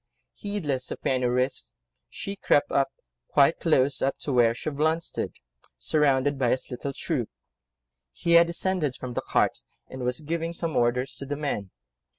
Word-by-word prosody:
Heedless 150 -11 -3
of - - -4
any 130 -1 +2
risks, 125 - -1 0.3
she 200 - -6
crept 145 -6 +2 0.6
quite 145 +3 +4
close 140 -4 +2
up 135 - +1
to 140 - -2
where 115 -2 +4
Chauvelin 155 +5 0
stood, - - -4 0.4
surrounded 140 - +2
by 125 -3 +2
his 130 - -1
little 125 +3 -4
troop: 135 -4 -2 0.8
he 170 - -2
had 170 0 +7
descended 170 -5 -1
from 130 -2 -6
the - - -1
cart, - - +1 0.3
and 130 - -7
was 125 +4 -1
giving 165 +2 -2
some 165 -3 -3
orders 125 +2 +1
to 140 - -7
the 145 - -2
men. 140 -10 -3
140 Hz, 160 wpm, -26 LUFS, 125-160 Hz, 0.8 s, had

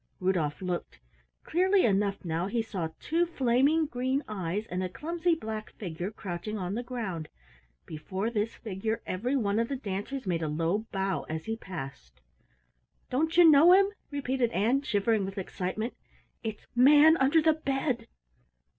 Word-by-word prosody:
Rudolf 180 -3 0
looked. 180 -1 -3 0.5
Clearly 375 +3 +3
enough 200 -1 +1
now 170 +2 -1
he 230 +2 -1
saw 190 -7 -3
two 335 +3 +1
flaming 280 +2 +2
green 260 +1 -1
eyes 200 0 -3
and 180 -2 -3
a 185 - -2
clumsy 335 - 0
black 220 -7 -6
figure 175 -1 -5
crouching 205 0 -5
on 185 -1 -3
the 235 - -2
ground. 225 -10 -5 0.6
Before 190 +8 -4
this 220 0 -1
figure 220 +1 -3
every 245 +9 -1
one 210 -4 +1
of 230 - +1
the 280 - -1
dancers 230 +3 -4
made 175 -3 -1
a 160 - -1
low 165 +8 -1
bow 195 -5 -1
as 160 0 -4
he 225 - -2
passed. 135 - -8 0.9
"Don't 320 +6 0
you 350 -1 +9
know 315 +3 +8
him?" 390 +1 +5 0.2
repeated 265 -4 0
Ann, 235 +8 +2
shivering 220 -3 +1
with 195 +1 -5
excitement. 195 +4 -3 0.5
"It's 220 -3 -5
Manunderthebed!" 290 -2 +4
220 Hz, 145 wpm, -29 LUFS, 185-270 Hz, 0.9 s, you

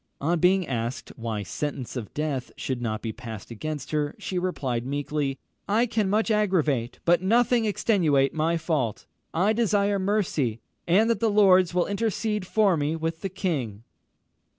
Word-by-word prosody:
On 165 +4 +1
being 185 0 +3
asked 120 -1 -3
why 115 -3 -3
sentence 135 +4 -4
of 120 -5 -5
death 145 -4 -2
should 130 -2 -3
not 110 -2 -3
be 110 -2 -3
passed 110 -2 -8
against 150 +4 -5
her, 150 -1 -1
she 185 - -3
replied 135 -10 -2
meekly, 140 +1 -2 0.3
"I 225 +4 +3
can 220 -4 0
much 220 +3 +1
aggravate, 160 - +1
but 175 0 +4
nothing 235 +4 +3
extenuate 165 -10 +2
my 165 +2 +1
fault. 150 - -1 0.3
I 195 +6 +2
desire 205 -3 +2
mercy, 185 - 0 0.3
and 195 +6 +4
that 230 - 0
the 230 - +2
lords 185 -4 +5
will 180 - +3
intercede 210 -1 -1
for 205 -4 +3
me 150 +1 -1
with 165 0 -3
the 195 - -2
king." 135 - -3
165 Hz, 160 wpm, -26 LUFS, 135-200 Hz, 0.3 s, lords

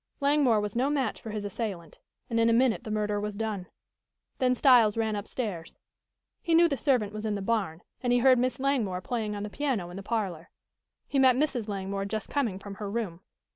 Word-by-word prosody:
Langmore 280 -6 +3
was 210 0 -3
no 260 +4 +2
match 280 -3 -1
for 225 - -7
his 210 -1 -4
assailant, 195 -6 -5 0.3
and 230 -3 0
in 230 0 +4
a - - +4
minute 240 0 +2
the - - -5
murder 210 -1 0
was 210 0 -4
done. 205 -4 -3 0.7
Then 255 -1 +3
Styles 240 -5 +5
ran 220 -1 0
upstairs. 205 -4 -5 0.6
He 335 -1 +2
knew 340 +1 +7
the 290 - -1
servant 235 -5 +1
was 215 0 -5
in 215 -2 -1
the 200 - -3
barn, 195 -7 -1 0.2
and 245 - 0
he 245 - +5
heard 255 0 +5
Miss 255 +1 0
Langmore 240 -10 0
playing 220 -2 -3
on 205 - -4
the 210 - -4
piano 240 -12 -2
in 180 - -8
the - - -5
parlor. 195 -6 -3 0.6
He 275 - 0
met 260 -2 +6
Mrs. 260 -5 0
Langmore 195 -1 -3
just 215 +1 -4
coming 240 -10 0
from 195 +1 -8
her 205 - -3
room. 200 -6 -3
220 Hz, 210 wpm, -28 LUFS, 200-255 Hz, 0.7 s, knew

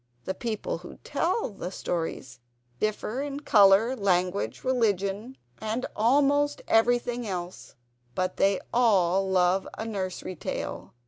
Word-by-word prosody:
The 190 - -2
peoples 215 -5 -4
who 175 - -10
tell 340 +9 0
the 185 -3 -6
stories 165 -9 -4 0.4
differ 215 +4 -1
in 285 0 -4
colour; 210 0 +5
language, 185 -3 0
religion, 220 -1 0 0.2
and 220 +3 -2
almost 285 +5 +2
everything 240 +1 +2
else; 180 -2 -6 0.4
but 185 0 -1
they 195 -1 +3
all 195 -5 +3
love 185 0 +2
a 220 - -4
nursery 185 -4 -4
tale. 150 - -5
205 Hz, 120 wpm, -27 LUFS, 185-245 Hz, 0.4 s, colour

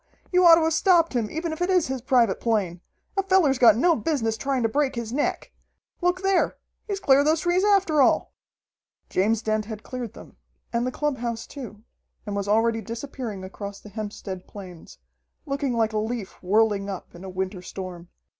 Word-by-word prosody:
You 365 0 +4
ought 335 - +10
to 330 - +2
have 320 0 +2
stopped 335 -2 +4
him, 230 -4 0
even 325 +1 -3
if 315 - -8
it 355 - +1
is 365 -4 +3
his 260 -1 -3
private 240 -5 +2
plane! 195 -7 -1 0.4
A - - +4
feller's 375 -9 +3
got 225 -3 +7
no 335 +6 +4
business 270 -9 -1
trying 270 +1 -1
to - - +4
break 275 +3 0
his 235 -1 -4
neck! 290 - -1 0.5
Look 360 +1 +1
there! 385 -2 +2 0.3
He's 400 -2 -2
cleared 280 -3 +4
those 315 +1 +3
trees 355 +2 +2
after 385 -8 +3
all!" - - +2 0.8
James 215 +4 +1
Dent 215 -1 0
had 220 0 -7
cleared 245 -4 -6
them, - - -14 0.4
and 235 +1 0
the - - -2
clubhouse 245 -6 -2
too, 225 -7 -9 0.4
and 205 -1 -4
was 200 0 -2
already 225 +2 +2
disappearing 230 -3 -6
across 200 +1 -7
the 210 - -13
Hempstead 205 -3 -6
Plains, 185 -5 -11 0.5
looking 275 -2 -1
like 225 -1 +1
a 215 - +1
leaf 220 -2 -5
whirling 205 +1 +2
up 190 -2 -7
in 175 - -11
a 190 - -7
winter 185 0 -4
storm. 180 -2 -8
235 Hz, 190 wpm, -25 LUFS, 210-300 Hz, 0.8 s, ought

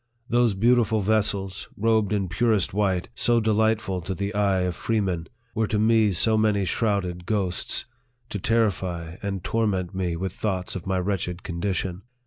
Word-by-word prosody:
Those 120 -3 +3
beautiful 115 0 +3
vessels, 100 -2 0
robed 110 -1 +2
in 100 -3 0
purest 105 +1 +1
white, 95 -3 0
so 120 0 +2
delightful 110 -3 +1
to 95 +3 -4
the 100 +3 -3
eye 100 -2 +2
of 90 -1 -1
freemen, 95 -7 -1 0.3
were 110 -1 0
to 105 - 0
me 110 -1 +4
so 110 +5 +3
many 105 -2 +2
shrouded 90 -4 -1
ghosts, 95 -5 -1 0.4
to 100 - -3
terrify 90 -6 0
and 100 -3 -3
torment 100 -5 0
me 90 -3 -1
with 95 +1 -3
thoughts 95 -4 -2
of 95 -1 -6
my 95 -1 +1
wretched 90 -2 -2
condition. 90 +1 -2
100 Hz, 155 wpm, -25 LUFS, 90-110 Hz, 0.4 s, me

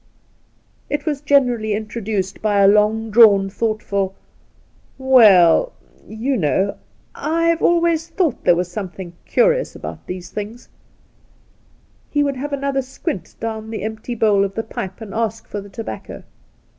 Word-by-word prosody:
It 290 0 -2
was 295 -3 -2
generally 245 -7 +2
introduced 210 -3 -4
by 205 -2 +2
a 195 - +6
long 210 +2 +2
drawn, 205 -3 +6
thoughtful, 200 -3 -2 0.4
' - - -35
We 265 -3 +6
U, 185 - +5 0.4
you 245 +5 -2
know, 190 +3 0 0.4
I've 335 +1 0
always 335 -1 +2
thought 340 -7 -1
there 175 - +5
was 180 0 -2
something 185 -2 -6
curious - - +2
about - - -8
these 180 -1 -7
things,' 215 +3 -7 1.4
He 290 -1 +1
would 280 -2 -1
have 290 +3 -5
another 275 -1 -1
squint 265 - -6
down 220 -1 -5
the 220 -3 -5
empty 220 +2 -5
bowl 210 -3 +3
of 195 0 -3
the 225 - -2
pipe 190 -2 -7
and 205 -3 -8
ask 225 0 -2
for 205 - -5
the 200 - -12
tobacco. 220 +3 -8
220 Hz, 145 wpm, -20 LUFS, 200-275 Hz, 1.4 s, a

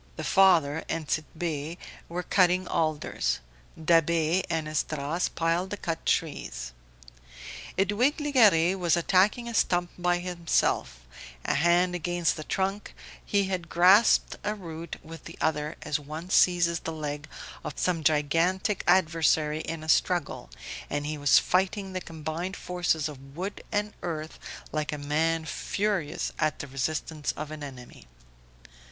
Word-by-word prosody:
The - - -5
father 165 -6 +4
and 165 -2 -3
Tit'Bé 155 +1 -3 0.3
were 175 +2 -3
cutting 180 0 +3
alders, 155 -2 0 0.4
Da'Be 165 +1 +3
and 160 -2 -1
Esdras 155 +2 -1
piled 170 +3 0
the 205 - -4
cut 165 -4 -4
trees. 65 - -1 1.1
Edwige 205 - +2
Legare 215 - +4
was 175 -1 +2
attacking 195 +7 +2
a 235 - -5
stump 175 -5 +1
by 175 0 +2
himself; 170 - 0 0.4
a - - +1
hand 175 +4 +3
against 175 -1 0
the 155 - -6
trunk, 195 +5 -2 0.3
he 200 -1 +1
had 185 -4 -3
grasped 190 +6 +5
a 210 +1 -1
root 170 -4 -7
with 165 -1 -10
the - - -10
other 150 0 -1
as 150 - -1
one 155 +5 -8
seizes 170 -2 +4
the 165 - -5
leg 150 -1 -5 0.4
of - - -6
some 170 -3 0
gigantic 165 +6 +1
adversary 160 -3 +3
in 160 -1 -5
a - - -8
struggle, 175 +2 +1 0.4
and 145 0 -2
he 150 0 -3
was 145 -1 +5
fighting 190 +1 +1
the 185 - -3
combined 165 +4 -5
forces 175 -4 0
of 135 -2 -11
wood 190 +4 -5
and 210 0 -1
earth 160 -2 -5 0.3
like 155 -1 -2
a 150 - -3
man 160 +3 0
furious 195 -2 -2
at 155 0 +1
the - - -5
resistance 150 +3 -3
of 155 0 -6
an 155 -1 -7
enemy. 125 - -10
165 Hz, 140 wpm, -27 LUFS, 155-180 Hz, 1.1 s, grasped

